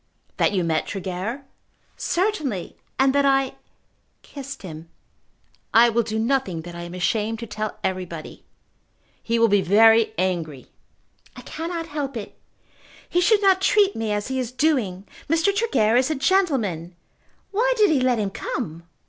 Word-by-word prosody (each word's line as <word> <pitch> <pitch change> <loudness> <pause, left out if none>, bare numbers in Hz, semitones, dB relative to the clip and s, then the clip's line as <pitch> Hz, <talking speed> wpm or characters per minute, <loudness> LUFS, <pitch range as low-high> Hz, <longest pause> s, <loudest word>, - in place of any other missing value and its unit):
"That - - +3
you 190 -3 0
met 160 -2 0
Tregear?" 195 +8 -4 0.5
"Certainly; 315 - -2 0.2
and 265 0 +3
that 285 0 +3
I 270 -1 +2 0.7
kissed 275 -3 -9
him. 165 -2 -9 0.9
I 235 +1 +7
will 235 +1 +2
do 220 -1 -3
nothing 225 -7 0
that 175 +1 -9
I 170 - -7
am 175 +1 -7
ashamed 215 +4 0
to 230 - -6
tell 215 0 -5
everybody." 180 -4 -5 0.8
"He 230 0 0
will 230 0 +5
be 205 -2 +3
very 225 +4 +5
angry." 165 -7 -2 0.6
"I - - -10
cannot 330 +1 -5
help 290 -5 -4
it. 210 - -8 0.7
He 355 - +1
should 415 +3 +3
not 380 -1 +4
treat 405 0 +3
me 225 -1 -2
as 205 +3 -2
he 265 0 -1
is 250 -2 -3
doing. 250 -10 0 0.2
Mr. 330 +5 +2
Tregear 400 - +2
is 260 +3 +2
a 310 - 0
gentleman. 260 - 0 0.6
Why 470 +5 +2
did 420 -4 +4
he 295 - +3
let 255 -1 +2
him 205 -3 -1
come? 165 -2 -5
230 Hz, 155 wpm, -23 LUFS, 190-290 Hz, 0.9 s, I